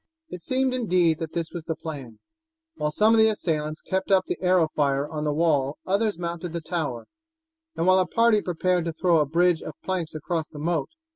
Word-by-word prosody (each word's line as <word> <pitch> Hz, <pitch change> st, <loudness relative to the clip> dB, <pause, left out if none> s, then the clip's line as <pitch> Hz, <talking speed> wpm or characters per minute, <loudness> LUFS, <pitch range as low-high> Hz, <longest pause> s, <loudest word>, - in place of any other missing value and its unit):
It 180 Hz, -, -8 dB
seemed, 260 Hz, +5 st, 0 dB
indeed, 180 Hz, -10 st, +2 dB
that 160 Hz, -1 st, -5 dB
this 165 Hz, -1 st, -3 dB
was 170 Hz, -3 st, -5 dB
the 160 Hz, -, -2 dB
plan. 140 Hz, -9 st, -8 dB, 0.6 s
While 150 Hz, -, -2 dB
some 210 Hz, +9 st, +3 dB
of 225 Hz, -, +4 dB
the 220 Hz, 0 st, +6 dB
assailants 155 Hz, -7 st, -2 dB
kept 190 Hz, 0 st, -2 dB
up 190 Hz, -1 st, +4 dB
the -, -, -4 dB
arrow 180 Hz, -3 st, +3 dB
fire 140 Hz, -1 st, +1 dB
on 155 Hz, -1 st, -4 dB
the 150 Hz, -, +1 dB
wall 145 Hz, -3 st, +1 dB
others 205 Hz, 0 st, 0 dB
mounted 170 Hz, 0 st, -4 dB
the 170 Hz, -, -2 dB
tower, 155 Hz, -7 st, -3 dB, 0.7 s
while 185 Hz, +3 st, +4 dB
a 185 Hz, -, +1 dB
party 230 Hz, +1 st, +3 dB
prepared 180 Hz, -1 st, 0 dB
to 165 Hz, -, -2 dB
throw 170 Hz, 0 st, +2 dB
a 150 Hz, -, +1 dB
bridge 170 Hz, +2 st, +2 dB
of -, -, -7 dB
planks 175 Hz, -4 st, -3 dB
across 160 Hz, +1 st, -2 dB
the 150 Hz, -, -13 dB
moat. 165 Hz, +2 st, -1 dB
170 Hz, 205 wpm, -25 LUFS, 155-185 Hz, 0.7 s, the